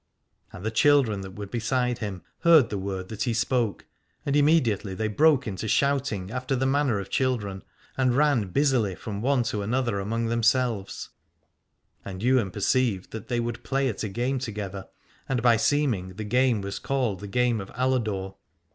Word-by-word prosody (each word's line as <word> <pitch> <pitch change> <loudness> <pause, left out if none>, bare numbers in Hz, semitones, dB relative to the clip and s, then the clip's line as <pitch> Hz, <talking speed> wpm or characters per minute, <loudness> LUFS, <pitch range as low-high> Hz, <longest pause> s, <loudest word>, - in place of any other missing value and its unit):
And 90 - -9
the 110 - 0
children 120 -4 +3
that 95 -1 -9
were 105 - -5
beside 120 +3 -1
him 100 -6 -5 0.2
heard 160 -7 +5
the 105 - -1
word 95 -1 -4
that 110 -1 -7
he 120 -4 0
spoke, 115 -2 0 0.4
and 140 - 0
immediately 130 - +2
they 110 +2 -1
broke 145 +5 +3
into 105 0 -4
shout 140 +4 +1
ing 95 -2 -5
after 130 +2 -2
the 130 +1 0
manner 135 -5 +1
of 100 0 -7
children, 105 -7 -1 0.3
and 130 -1 +2
ran 145 -8 +3
busily 120 -3 +1
from 100 +1 -6
one 130 0 +2
to 105 -3 -2
another 115 0 0
among 115 +4 -2
themselves: 115 -2 0 0.9
and 95 +1 -7
Ywain 125 -5 +3
perceived 100 0 0
that 110 -2 -7
they 120 -1 -1
would 120 -1 -3
play 135 0 0
at 110 - -5
a 110 - -2
game 125 +6 -1
together, 100 -5 -5 0.4
and 125 -3 0
by 120 -2 +6
seeming 110 -8 0
the 110 - -5
game 125 0 +2
was 100 0 -5
called 125 -8 -1
the 105 - -7
game 120 +1 +1
of 95 - -9
Aladore. 110 -7 -1
115 Hz, 180 wpm, -26 LUFS, 100-130 Hz, 0.9 s, by